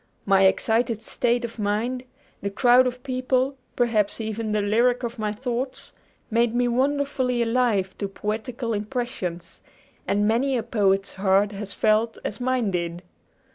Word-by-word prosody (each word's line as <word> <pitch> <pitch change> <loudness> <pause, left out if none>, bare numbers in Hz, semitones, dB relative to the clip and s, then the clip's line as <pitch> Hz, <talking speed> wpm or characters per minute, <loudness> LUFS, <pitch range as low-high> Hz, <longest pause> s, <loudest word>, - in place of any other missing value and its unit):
My 195 -1 +5
excited 225 +3 +2
state 240 +1 0
of 230 0 -9
mind, 225 +5 -1 0.4
the 200 - -2
crowd 245 +5 +5
of 250 0 -5
people, 255 0 0 0.2
perhaps 225 -4 +1
even 220 0 -3
the 210 - +1
lyric 240 +4 +2
of 235 0 -4
my 210 -1 -1
thoughts, 250 +3 -4 0.4
made 230 +1 +2
me 245 0 +2
wonderfully 260 -1 +1
alive 230 -5 +1
to 200 - -1
poetical 225 +4 -3
impressions; 205 -6 -4 0.5
and 205 +1 +2
many 255 +4 +2
a 230 - -2
poet's 195 -4 +1
heart 195 +1 +2
has 200 0 -6
felt 220 +1 +2
as 205 - -4
mine 250 -4 +1
did! 170 0 -3
230 Hz, 145 wpm, -24 LUFS, 205-250 Hz, 0.5 s, My